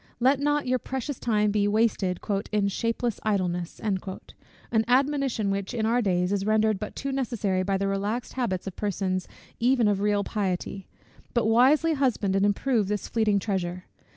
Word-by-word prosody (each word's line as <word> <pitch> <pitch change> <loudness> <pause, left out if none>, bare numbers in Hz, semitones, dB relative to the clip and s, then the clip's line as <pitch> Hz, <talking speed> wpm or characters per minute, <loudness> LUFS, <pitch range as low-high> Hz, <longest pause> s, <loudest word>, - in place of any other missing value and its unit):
Let 260 +3 +3
not 295 0 +1
your 255 0 +1
precious 265 +1 -4
time 210 -3 +1
be 205 0 +2
wasted 205 -4 +1 0.3
"in 205 -2 +2
shapeless 230 +2 -1
idleness;" 180 -5 -1
an 200 -3 -1 0.9
admonition 265 -5 +1
which, 195 +4 -3
in 220 -2 0
our 235 +2 +2
days, 180 -3 +1
is 200 -1 0
rendered 215 -1 +2
but 210 - -6
too 275 - -3
necessary 230 -8 -1
by 195 +1 0
the 195 +1 -1
relaxed 205 +5 -2
habits 215 -8 -2
of 195 - -6
persons 190 -2 -2 0.3
even 245 -1 +3
of 205 -2 +2
real 205 0 +1
piety: 195 -2 -3 0.5
but 235 - +2
wisely 265 +9 +4
husband 245 -9 +1
and 195 +1 +3
improve 215 +1 +1
this 210 0 -2
fleeting 220 -3 +2
treasure. 185 -3 -2
210 Hz, 165 wpm, -26 LUFS, 195-245 Hz, 0.9 s, wisely